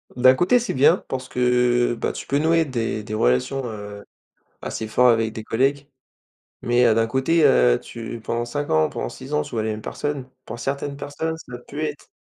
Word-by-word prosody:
D'un 130 +1 +6
côté, 185 - +3
c'est 240 - -3
bien 140 +7 +5
parce 130 -1 -4
que, 125 -1 +2
heu, - - -4
bah 115 - -2
tu - - -8
peux 140 - +1
nouer 165 +2 +3
des 115 -5 -3
des 110 - -7
relations, 110 - +1
heu, 105 -3 -7 0.6
assez 110 - -4
fort 125 +3 +4
avec 115 -1 +2
des 110 - -6
collègues. 135 +5 0 0.7
Mais 120 +1 +3
heu, 115 - +5
d'un 115 +1 +2
côté, 135 +7 +2
heu, 60 - +5
tu 115 0 -8
pendant 115 +1 -2
5, 120 - 0
pendant - - -4
6, 75 - -3
tu - - -8
vois 110 -2 -1
les 110 - -1
mêmes 110 0 -5
personnes. 140 +2 -4 0.2
Pour 120 - -7
certaines 140 +2 -3
personnes, 145 +3 -4
ça 125 -6 -9
peut 145 - -7
être 150 -2 -4
125 Hz, 200 wpm, -22 LUFS, 110-140 Hz, 0.7 s, D'un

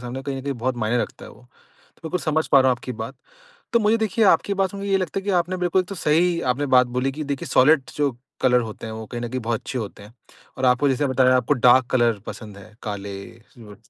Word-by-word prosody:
सामने, 125 +2 -6
कहीं 140 -1 -4
न 135 - -6
कहीं 140 +1 -2
बहुत 125 0 -3
मायने 115 +1 0
रखता - - -8
है - - -11
वो। 115 - -18 0.5
तो - - -28
बिल्कुल 170 +2 -3
समझ 155 0 0
पा 140 - +6
रहा 130 0 +4
हूँ 125 - +1
आपकी 125 - -6
बात। 115 +3 -6 0.6
तो 235 - +5
मुझे, 215 +1 +3
देखिए, 220 0 +1
आपकी 200 +1 +3
बात 195 -1 0
सुनके 200 0 -6
ये 195 - +3
लगता 190 +1 -2
है - - -11
कि - - -2
आपने 185 +2 -5
बिल्कुल 180 +1 +1
तो 195 +2 -8
सही, 170 +1 +1
आपने 130 +1 0
बात 125 0 +4
बोली 135 +2 0
कि 155 +3 -5
देखिए, 140 -2 -4
सॉलिड 145 +3 +5
जो 140 -5 -1 0.2
कलर 125 -1 +4
होते 110 -1 -7
हैं, 110 - -6
वो 110 0 -7
कहीं 120 +2 -6
न 120 - -3
कहीं 130 +2 -3
बहुत 115 -1 -1
अच्छे 130 - -6
होते 105 -2 -7
हैं 105 +3 -15 0.4
और 130 - 0
आपको 125 +3 +3
जैसे 135 +2 +1
बताया, 130 -1 +3
आपको 135 - +1
डार्क 125 0 +5
कलर 120 -2 +3
पसंद 105 -3 -8
है, 105 +2 -14
काले, 100 -2 -5 0.4
सिल्वर 105 -4 -13
130 Hz, 260 wpm, -22 LUFS, 120-160 Hz, 0.6 s, पा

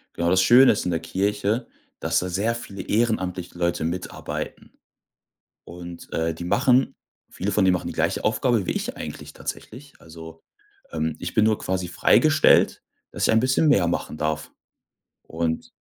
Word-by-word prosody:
Genau, 85 0 0
das 95 +1 +4
Schöne 125 +6 +7
ist - - -2
in 90 - 0
der 85 - 0
Kirche, 105 +6 -1 0.3
dass 80 0 +1
da 90 - -4
sehr 105 +6 0
viele 100 -4 -8
ehrenamtliche 95 -6 -1
Leute 85 -1 -1
mitarbeiten, 90 +3 -5 0.9
und, 85 0 -10
äh, 80 0 0
die 85 - -8
machen 125 +7 +2 0.4
viele 100 +2 -3
von 100 0 +2
denen 95 -1 +4
machen 90 - -3
die - - -5
gleiche - - -1
Aufgabe 110 -1 +1
wie - - -2
ich - - -4
eigentlich - - -8
tatsächlich. 140 +5 -8
Also, 80 0 -12 0.5
ähm, 80 -1 -2
ich 85 - -5
bin 110 - +3
nur 110 -1 +2
quasi 95 -1 -3
freigestellt, 155 - +4 0.3
dass - - -4
ich - - +3
ein 110 - +4
bisschen 130 +5 +2
mehr 100 -11 +4
machen 85 - -3
darf, 75 0 -3 0.7
und 80 0 -3
95 Hz, 165 wpm, -23 LUFS, 85-110 Hz, 0.9 s, Schöne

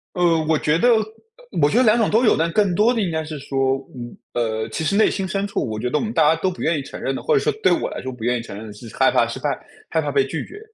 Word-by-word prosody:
呃， 170 -2 +3
我 160 -1 +3
觉 150 +2 +1
得 245 +8 +3 0.7
我 145 - +5
觉 225 - +1
得 255 - +5
2 220 +1 +4
种 225 - +2
都 225 +4 +3
有， 220 - +5
但 165 +1 0
更 205 -4 +2
多 225 +5 +4
的 225 - 0
应 180 -4 -1
该 160 0 -2
是 155 -1 -7
说， 135 -1 0 0.2
嗯 120 -1 -8 0.2
呃， 110 -2 -2
其 160 - -4
实 195 +6 0
内 215 - +4
心 190 -2 -3
深 195 +1 -2
处 200 - -2
我 110 -1 -4
觉 125 +2 -2
得 150 - +1
我 - - -2
们 225 - -3
大 160 -3 +4
家 165 +1 +3
都 190 - +2
不 - - -9
愿 160 -1 +1
意 - - -3
承 - - -9
认 135 - -1
的， - - -5
或 - - +1
者 - - +5
说 - - +1
对 185 - +5
我 - - 0
来 - - -6
说 130 - -5
不 120 -3 -10
愿 125 +1 +1
意 - - -4
承 105 - -9
认 110 +1 -8
的 105 - -9
是 110 +1 -12
害 - - +4
怕 - - +3
失 - - -6
败， - - -1 0.4
害 160 - +1
怕 145 -1 -3
被 140 -1 +3
拒 160 - -4
绝。 415 - -11
160 Hz, 350 characters per minute, -21 LUFS, 130-195 Hz, 0.7 s, 我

